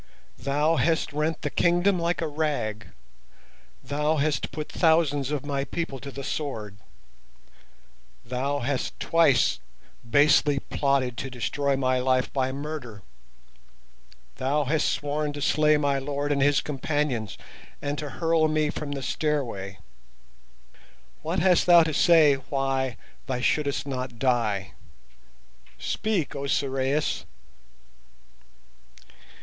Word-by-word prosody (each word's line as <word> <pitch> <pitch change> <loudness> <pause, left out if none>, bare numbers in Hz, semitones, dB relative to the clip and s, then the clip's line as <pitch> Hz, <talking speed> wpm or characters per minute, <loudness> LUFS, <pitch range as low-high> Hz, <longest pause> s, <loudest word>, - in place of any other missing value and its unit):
"Thou 145 +5 +1
hast 160 -2 +1
rent 155 +2 -1
the 145 - -2
kingdom 175 +2 +2
like 170 +1 -1
a 165 - 0
rag, 145 - -2 1.0
thou 150 +3 0
hast 150 +1 0
put 150 +2 -5
thousands 160 -5 +2
of 145 -2 -3
my 140 -1 -1
people 145 -3 -4
to 140 - -8
the 140 0 -7
sword, 110 -10 -4 1.5
thou 135 +4 -2
hast 130 +1 -2
twice 165 -7 +3 0.4
basely 145 +3 +4
plotted 135 -3 0
to 135 - -4
destroy 135 +3 -1
my 130 -1 +1
life 130 0 +1
by 130 -1 0
murder, 135 -7 -6 1.3
thou 145 +3 +1
hast 150 +3 +1
sworn 145 0 -2
to 145 - -6
slay 150 +2 +3
my 140 -2 +1
lord 145 +1 -3
and 140 -1 +1
his 145 0 +4
companions 140 -5 -2 0.4
and 145 0 -3
to 150 - -4
hurl 160 +6 +1
me 155 -1 +1
from 145 -2 -5
the 135 -1 -5
Stairway. 120 -12 -2 1.4
What 165 +4 -2
hast 180 0 +3
thou 175 -1 +8
to 160 -1 -2
say 155 -3 +5
why 135 -3 -1 0.3
thou 130 -2 -2
shouldst 140 +2 0
not 130 -3 -4
die? 115 -7 0 1.1
Speak, 205 -8 -2
O 140 0 -4
Sorais!" 135 -5 0
145 Hz, 120 wpm, -26 LUFS, 130-155 Hz, 1.5 s, thou